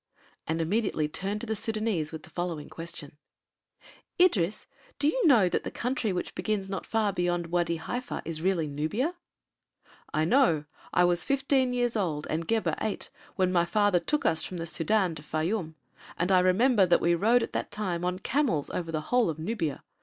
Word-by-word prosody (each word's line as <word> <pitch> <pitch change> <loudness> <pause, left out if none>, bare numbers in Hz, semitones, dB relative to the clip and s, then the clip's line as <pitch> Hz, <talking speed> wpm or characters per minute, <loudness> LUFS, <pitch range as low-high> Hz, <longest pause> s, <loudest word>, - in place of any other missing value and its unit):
and 160 +1 -1
immediately 165 -2 0
turned 195 +7 -3
to 240 - -5
the 220 - -1
Sudânese 215 -7 -1
with 160 -1 -7
the - - -15
following 175 -4 -4
question: 160 -3 -8 1.0
"Idris, 215 - +3 0.3
do 285 - +2
you 400 +5 +2
know 230 -10 +6
that - - -1
the - - -3
country 245 -3 -1
which 180 - -3
begins 210 -3 -2
not 190 - -4
far 215 -3 +1
beyond 175 -2 -1
Wâdi 170 -1 +1
Haifa 245 +9 -4
is 160 -1 -4
really 180 -2 +1
Nubia?" 160 - -1 1.0
"I 155 +1 +1
know. 170 - +3 0.3
I 180 - +4
was 175 -1 +2
fifteen 275 0 +2
years 245 -1 0
old 160 -8 -1
and 160 +1 -2
Gebhr 225 -1 +1
eight, 215 - -2 0.2
when 185 -1 +2
my 175 -2 +3
father 205 0 +2
took 300 - -1
us 160 -1 +3
from 185 - -5
the 165 - -3
Sudân 170 +2 +1
to - - -9
Fayûm, 160 +2 -2 0.4
and 180 +3 0
I 185 - +6
remember 195 +3 +4
that 175 - +4
we 170 +1 +2
rode 230 +7 +3
at - - -4
that - - -2
time 180 -5 -3
on 180 0 0
camels 225 - 0
over 165 -2 -3
the 155 -1 -1
whole 245 +6 +2
of 155 - -3
Nubia. 160 - -3
185 Hz, 190 wpm, -28 LUFS, 165-225 Hz, 1.0 s, know